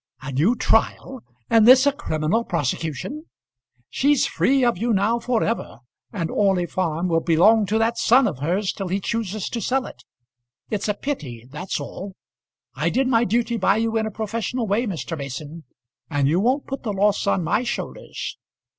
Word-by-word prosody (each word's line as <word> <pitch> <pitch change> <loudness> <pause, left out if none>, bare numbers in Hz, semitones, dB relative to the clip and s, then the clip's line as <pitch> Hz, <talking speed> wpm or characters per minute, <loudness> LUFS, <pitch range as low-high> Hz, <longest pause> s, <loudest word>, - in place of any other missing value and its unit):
"A 135 - -5
new 160 - +2
trial; 250 +2 0 0.3
and 225 -1 +5
this 260 +2 +8
a 285 - +5
criminal 195 - -1
prosecution! 165 - -3 0.6
She's 285 0 +2
free 270 0 +2
of 240 - +2
you 235 +1 +1
now 215 +4 +2
for 235 -1 0
ever, 230 - -3 0.3
and 175 -7 -3
Orley 190 -3 +2
Farm 175 -1 -1
will 165 -2 +2
belong 195 +7 +4
to 215 +3 +1
that 225 +1 +1
son 255 +3 +5
of 160 -10 -4
hers 180 +7 0
till 195 - -5
he 190 +3 -1
chooses 215 -2 -3
to 235 - -4
sell 260 +2 0
it. - - -11 0.7
It's 210 -1 -1
a 210 - 0
pity; 135 - -5
that's 150 +7 -4
all. 195 0 -7 0.6
I - - 0
did 265 0 +1
my 235 -2 +3
duty 235 +3 0
by 195 0 +2
you 225 0 0
in 220 -1 +1
a - - -2
professional 225 +3 -3
way, 215 +4 0
Mr. 170 -3 -4
Mason; 145 +3 -7 0.4
and 145 -3 +1
you 165 +5 +2
won't 255 +7 +1
put 270 0 -5
the 215 -4 -3
loss 200 +1 +1
on 185 - +2
my 170 +7 +1
shoulders." 245 - -5
210 Hz, 180 wpm, -22 LUFS, 170-235 Hz, 0.7 s, this